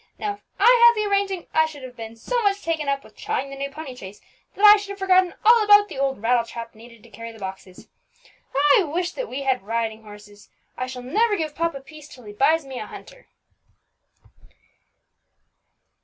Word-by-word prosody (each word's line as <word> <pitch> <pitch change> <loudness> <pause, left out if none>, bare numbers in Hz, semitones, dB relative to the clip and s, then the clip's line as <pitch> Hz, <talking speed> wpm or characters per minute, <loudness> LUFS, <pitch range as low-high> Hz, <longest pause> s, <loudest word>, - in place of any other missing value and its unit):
Now 415 -1 -3
if 405 - -15 0.2
I 400 - +3
had 475 0 +7
had 475 - +6
the 425 -1 -1
arranging, 395 -3 0
I 315 0 +3
should 290 -4 -11
have 250 -1 -10
been 225 -1 -9
so 480 - -2
much 405 -2 0
taken 315 -3 -2
up 275 0 -1
with - - -18
trying 275 +1 -3
the - - -7
new 275 0 -4
pony 280 -2 -9
chaise, 195 -4 -11 0.4
that 410 - +2
I 415 0 +10
should 405 -1 -8
have 400 - -6
forgotten 370 -2 +2
all 460 0 +6
about 415 0 +6
the - - -7
old 270 -5 -1
rattle 240 0 +2
trap 230 0 -9
needed 230 0 -16
to 235 - -17
carry 230 +3 -9
the 225 - -15
boxes. 190 -2 -9 0.9
I - - +3
wish 350 +3 -2
that - - -6
we 275 +2 -5
had 265 -2 0
riding 225 +1 -3
horses. 210 -1 -15 0.3
I 255 - -4
shall 255 -1 -8
never 415 - +1
give 310 -3 -3
papa 330 -3 -2
peace 300 +2 -14
till 255 -4 -15
he 210 -1 -10
buys 310 +7 +2
me 265 -2 -7
a - - -7
hunter." - - -13
280 Hz, 210 wpm, -23 LUFS, -, 0.9 s, I